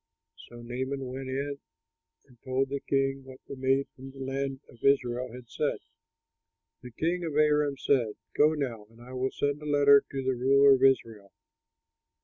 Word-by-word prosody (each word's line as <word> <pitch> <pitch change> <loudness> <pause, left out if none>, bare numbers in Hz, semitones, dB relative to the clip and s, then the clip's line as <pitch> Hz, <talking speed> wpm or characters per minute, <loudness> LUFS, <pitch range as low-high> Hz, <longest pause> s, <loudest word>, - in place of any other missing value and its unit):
So 120 0 -11
Naaman 130 +3 -4
went 130 +1 -6
in 140 +2 -3 0.7
and 125 -3 -24
told 130 +1 -1
the 140 0 -3
king 135 0 -1
what 130 0 -13
the - - -8
maid 135 +1 +1
from 135 +1 -10
the 135 - -15
land 135 0 -3
of 115 - -19
Israel 125 -3 +1
had 125 0 -11
said. 145 +5 -2 1.0
The 125 - -9
king 170 +9 -2
of 160 -3 -4
Aram 150 -2 +2
said, 120 -6 +1 0.2
"Go 155 +2 +4
now, 120 -8 -4
and 115 +1 -20
I 125 +2 -12
will 130 +1 -1
send 145 +2 -2
a 150 - -7
letter 140 -1 +6
to 135 -1 -3
the 130 0 +1
ruler 135 +3 +5
of 130 - +1
Israel." 115 -6 +1
135 Hz, 175 wpm, -28 LUFS, 125-140 Hz, 1.0 s, letter